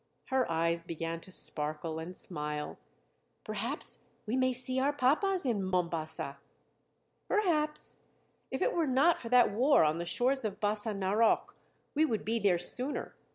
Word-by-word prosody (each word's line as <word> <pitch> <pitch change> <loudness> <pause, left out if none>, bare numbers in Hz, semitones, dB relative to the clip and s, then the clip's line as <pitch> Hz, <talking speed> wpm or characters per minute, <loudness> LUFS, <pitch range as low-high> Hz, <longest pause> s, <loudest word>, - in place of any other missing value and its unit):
Her 260 -5 +1
eyes 165 +1 0
began 165 0 -4
to 185 - -14
sparkle 155 -1 +1
and 175 +3 -7
smile: 150 -3 -2 0.6
"Perhaps 225 +7 -3 0.3
we 220 +3 -1
may 255 0 +2
see 255 +1 -1
our 275 +2 +2
papas 295 +7 +1
in 230 -6 +1
Mombasa." 165 -6 -2 0.9
"Perhaps. 310 -7 0 0.5
If - - -1
it - - +1
were 330 -3 +1
not 275 +6 +3
for 230 - -6
that 245 -3 +5
war 255 - +4
on 155 +2 +1
the 170 - -3
shores 255 +8 +1
of 210 -2 -3
Bassa 210 +1 -1
Narok, 200 +4 +2 0.4
we 305 - +3
would 230 -9 0
be 230 +2 0
there 195 -4 +3
sooner. 250 +11 -3
215 Hz, 155 wpm, -31 LUFS, 170-265 Hz, 0.9 s, that